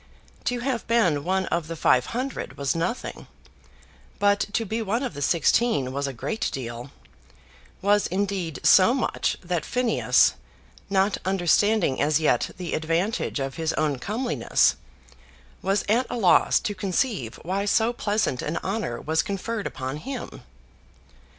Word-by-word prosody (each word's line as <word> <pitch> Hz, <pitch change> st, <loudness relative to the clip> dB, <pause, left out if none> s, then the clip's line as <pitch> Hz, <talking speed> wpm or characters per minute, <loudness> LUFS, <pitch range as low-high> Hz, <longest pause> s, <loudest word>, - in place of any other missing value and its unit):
To 245 Hz, -1 st, -1 dB
have 250 Hz, -3 st, -2 dB
been 185 Hz, -11 st, +2 dB
one 190 Hz, +2 st, 0 dB
of 170 Hz, -2 st, -1 dB
the 165 Hz, -, -5 dB
five 125 Hz, -5 st, +3 dB
hundred 255 Hz, +3 st, -4 dB
was 140 Hz, +1 st, 0 dB
nothing; 175 Hz, +9 st, -3 dB, 0.9 s
but 205 Hz, 0 st, +3 dB
to 225 Hz, +1 st, 0 dB
be 220 Hz, +3 st, -2 dB
one 225 Hz, +5 st, -1 dB
of 255 Hz, -, -3 dB
the 145 Hz, -, -7 dB
sixteen 150 Hz, -, +2 dB
was 140 Hz, +1 st, -2 dB
a -, -, -3 dB
great 175 Hz, -, -3 dB
deal, 120 Hz, 0 st, -6 dB, 0.9 s
was 205 Hz, +1 st, +3 dB
indeed 185 Hz, -4 st, -2 dB
so 200 Hz, +7 st, +6 dB
much 260 Hz, -, -1 dB
that 175 Hz, -2 st, -2 dB
Phineas, 250 Hz, -3 st, +3 dB, 0.6 s
not 195 Hz, +1 st, +2 dB
understanding 190 Hz, -2 st, +2 dB
as 150 Hz, +1 st, +3 dB
yet 150 Hz, -6 st, +2 dB
the 175 Hz, -2 st, -5 dB
advantage 165 Hz, +3 st, -1 dB
of 135 Hz, +2 st, -4 dB
his 160 Hz, 0 st, -1 dB
own 150 Hz, -4 st, 0 dB
comeliness, 235 Hz, -, +1 dB, 0.9 s
was 195 Hz, +2 st, 0 dB
at 235 Hz, +5 st, +2 dB
a -, -, -3 dB
loss 190 Hz, -6 st, +4 dB
to 210 Hz, -, -2 dB
conceive 190 Hz, -, -1 dB
why 195 Hz, +4 st, -1 dB
so 225 Hz, +3 st, +2 dB
pleasant 205 Hz, -, -1 dB
an 150 Hz, -, -3 dB
honour 195 Hz, -, -2 dB
was 160 Hz, +1 st, +1 dB
conferred 210 Hz, +1 st, -3 dB
upon 130 Hz, +2 st, -5 dB
him. 265 Hz, -, -7 dB
190 Hz, 145 wpm, -25 LUFS, 155-220 Hz, 0.9 s, so